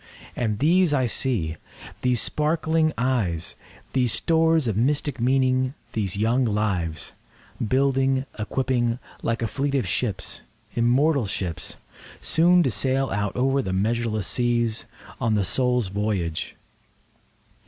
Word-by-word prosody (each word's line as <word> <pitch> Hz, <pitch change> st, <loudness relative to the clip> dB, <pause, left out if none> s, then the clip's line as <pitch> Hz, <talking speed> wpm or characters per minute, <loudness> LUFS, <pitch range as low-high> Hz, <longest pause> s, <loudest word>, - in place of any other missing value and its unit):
And 110 Hz, -3 st, -1 dB
these 165 Hz, -, +3 dB
I 130 Hz, -2 st, +2 dB
see—these 120 Hz, -, -1 dB
sparkling 160 Hz, +2 st, +1 dB
eyes, 110 Hz, -10 st, 0 dB, 0.4 s
These 125 Hz, -3 st, +3 dB
stores 160 Hz, -2 st, +2 dB
of 110 Hz, -, 0 dB
mystic 140 Hz, +3 st, 0 dB
meaning—these 130 Hz, -, 0 dB
young 115 Hz, +5 st, +2 dB
lives, 95 Hz, -, -1 dB, 0.5 s
Building, 135 Hz, +2 st, +1 dB
equipping, 120 Hz, +1 st, 0 dB, 0.2 s
like 115 Hz, 0 st, -1 dB
a -, -, +1 dB
fleet 140 Hz, +4 st, -2 dB
of 125 Hz, -8 st, 0 dB
ships—immortal 120 Hz, -, -1 dB
ships! 90 Hz, -4 st, -4 dB, 0.4 s
Soon 175 Hz, +2 st, +4 dB
to 130 Hz, -, 0 dB
sail 135 Hz, +3 st, +1 dB
out 105 Hz, 0 st, -2 dB
over 135 Hz, +2 st, +2 dB
the 95 Hz, -6 st, -3 dB
measureless 110 Hz, +1 st, 0 dB
seas, 120 Hz, -2 st, 0 dB, 0.3 s
On 110 Hz, -2 st, +1 dB
the 100 Hz, -2 st, +1 dB
Soul's 125 Hz, +1 st, +1 dB
voyage. 95 Hz, -5 st, -2 dB
125 Hz, 110 wpm, -24 LUFS, 105-135 Hz, 0.5 s, Soon